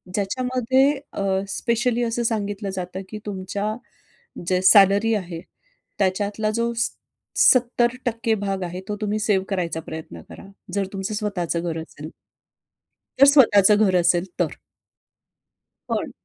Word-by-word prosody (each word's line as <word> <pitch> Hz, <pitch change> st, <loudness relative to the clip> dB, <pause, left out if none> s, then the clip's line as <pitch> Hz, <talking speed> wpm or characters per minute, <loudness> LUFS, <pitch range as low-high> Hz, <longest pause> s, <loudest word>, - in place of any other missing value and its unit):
ज्याच्यामध्ये 255 Hz, +5 st, +1 dB, 0.3 s
अ, -, -, -4 dB, 0.3 s
स्पेशली 240 Hz, 0 st, 0 dB
असं 235 Hz, 0 st, -1 dB
सांगितलं 205 Hz, -2 st, -3 dB
जातं, 180 Hz, +1 st, -5 dB
की 215 Hz, -, -7 dB
"तुमच्या 200 Hz, +1 st, -3 dB, 0.8 s
जे 185 Hz, 0 st, +1 dB
सॅलरी 200 Hz, +2 st, +5 dB
आहे, 175 Hz, -5 st, -5 dB, 0.6 s
त्याच्यातला 205 Hz, +3 st, 0 dB
जो 235 Hz, 0 st, -1 dB
स 230 Hz, 0 st, -1 dB, 0.5 s
सत्तर 240 Hz, -1 st, +4 dB
टक्के 230 Hz, -1 st, 0 dB
भाग 195 Hz, -1 st, -2 dB
आहे, 180 Hz, +1 st, -5 dB
तो 210 Hz, -, -3 dB
तुम्ही 210 Hz, 0 st, -1 dB
सेव्ह 205 Hz, -3 st, +1 dB
करायचा 175 Hz, -4 st, -2 dB
प्रयत्न 160 Hz, -, -8 dB
करा. -, -, -11 dB, 0.3 s
जर 200 Hz, -1 st, 0 dB
तुमचं 195 Hz, +2 st, -4 dB
स्वतःचं 195 Hz, -6 st, -2 dB
घर 160 Hz, -, -4 dB
असेल." 155 Hz, -1 st, -10 dB, 1.1 s
जर 275 Hz, -, +9 dB
स्वतःच 220 Hz, -8 st, +6 dB
घर 205 Hz, -3 st, +4 dB
असेल 175 Hz, 0 st, +3 dB
तर. 170 Hz, -4 st, 0 dB, 1.4 s
पण -, -, -2 dB
205 Hz, 130 wpm, -23 LUFS, 185-230 Hz, 1.4 s, जर